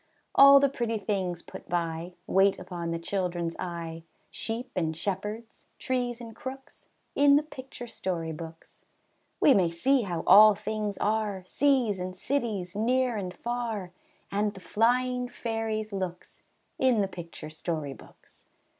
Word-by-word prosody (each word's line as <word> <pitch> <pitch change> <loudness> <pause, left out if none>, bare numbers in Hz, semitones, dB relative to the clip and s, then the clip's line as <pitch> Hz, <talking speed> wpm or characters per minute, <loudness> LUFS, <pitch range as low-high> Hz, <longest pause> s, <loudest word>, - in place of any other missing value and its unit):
All 275 0 +9
the 280 - +4
pretty 235 -4 -2
things 190 -4 -2
put - - -11
by, 170 0 -2
Wait 195 +1 +3
upon 170 -2 -5
the 165 - -1
children's 175 -1 -2
eye, 165 -2 -5 0.3
Sheep 240 +3 -4
and 160 -3 -1
shepherds, 210 +5 -5
trees 245 -2 -2
and 230 -2 -9
crooks, 265 +2 -9 0.3
In 285 0 +6
the 295 - +4
picture 260 -4 -9
story 175 -7 -3
books. 160 +1 -10 0.6
We 280 - +6
may 185 -7 +3
see 255 +11 +2
how 175 -6 -3
all 215 0 +9
things 210 -1 -3
are, 210 -3 0
Seas 255 -4 +2
and 185 0 -4
cities, 205 -6 -2
near 245 +3 +1
and 190 -4 -3
far, 225 -3 -4 0.4
And 205 +1 0
the - - -9
flying 250 +5 +1
fairies' 220 -2 -3
looks, 185 -2 -5 0.4
In 255 -5 +4
the 195 - +1
picture 170 -4 -9
story 155 -3 -3
books. - - -19
205 Hz, 145 wpm, -28 LUFS, 175-240 Hz, 0.6 s, All